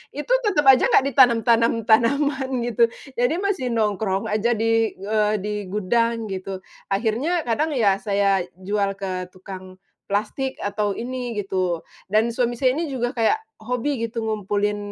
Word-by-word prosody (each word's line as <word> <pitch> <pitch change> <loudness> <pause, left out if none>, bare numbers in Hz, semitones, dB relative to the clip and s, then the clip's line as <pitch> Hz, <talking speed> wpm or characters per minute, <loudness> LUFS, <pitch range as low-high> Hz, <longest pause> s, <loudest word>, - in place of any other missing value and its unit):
itu 295 - -5 0.2
tetep 375 -8 +2
aja 265 -2 +6
gak - - +4
ditanam-tanam 235 -3 +3
tanaman 265 +5 +2 0.2
gitu, 235 0 +3 0.3
jadi 245 +6 +2
masih 375 -7 -1
nongkrong 205 -3 0
aja 215 +3 +1
di, 225 0 +1
eee, 210 +2 0
di 210 0 -2
gudang 225 +3 0
gitu. 190 0 -5 0.2
Akhirnya 235 - 0
kadang 295 +6 0
ya 205 -6 +3
saya 200 -3 +1
jual 195 +1 -1
ke 185 -2 -4
tukang 185 0 -10 0.3
plastik 215 +7 -2
atau 205 0 -1
ini 245 +2 -4
gitu 185 -5 -1 0.3
dan 220 +2 +3
suami 240 0 0
saya 255 +2 +1
ini 335 - -1
juga 245 -2 -1
kayak 245 - +1 0.2
hobi 250 +5 -2
gitu 230 0 -5
ngumpulin 210 -1 -1
225 Hz, 145 wpm, -23 LUFS, 200-250 Hz, 0.3 s, aja